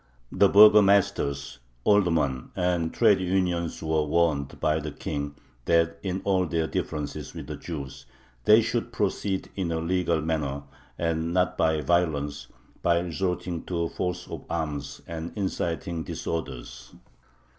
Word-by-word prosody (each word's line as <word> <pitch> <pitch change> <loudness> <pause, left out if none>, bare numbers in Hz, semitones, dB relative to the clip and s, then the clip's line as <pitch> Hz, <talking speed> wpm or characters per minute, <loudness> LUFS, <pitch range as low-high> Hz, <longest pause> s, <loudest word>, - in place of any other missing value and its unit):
The 100 - +4
burgomasters, 100 - +5 0.2
aldermen, 80 -10 +2
and 90 -2 0
trade 105 -5 +4
unions 90 -3 -1
were 80 -1 +1
warned 75 -3 0
by 75 +1 +1
the 75 0 -4
King 70 0 -4 0.3
that 85 0 +2
in 95 -1 -3
all 95 -2 +2
their 80 -1 0
differences 75 -2 -4
with - - -7
Jews 70 -6 -7 0.4
"they - - +7
should - - -2
proceed 95 -2 -1
in 90 -4 -2
a 80 - 0
legal 85 0 +1
manner, 75 -3 -2 0.3
and 85 0 -1
not 90 -2 +2
by 80 -1 +2
violence, 75 -5 0 0.3
by 85 -1 +3
resorting 90 0 -2
to 85 -2 -1
force 90 -1 -3
of - - -7
arms 75 -3 -3
and 80 0 -6
inciting 85 -3 -2
disorders." 65 -7 -6
85 Hz, 130 wpm, -26 LUFS, 75-90 Hz, 0.4 s, they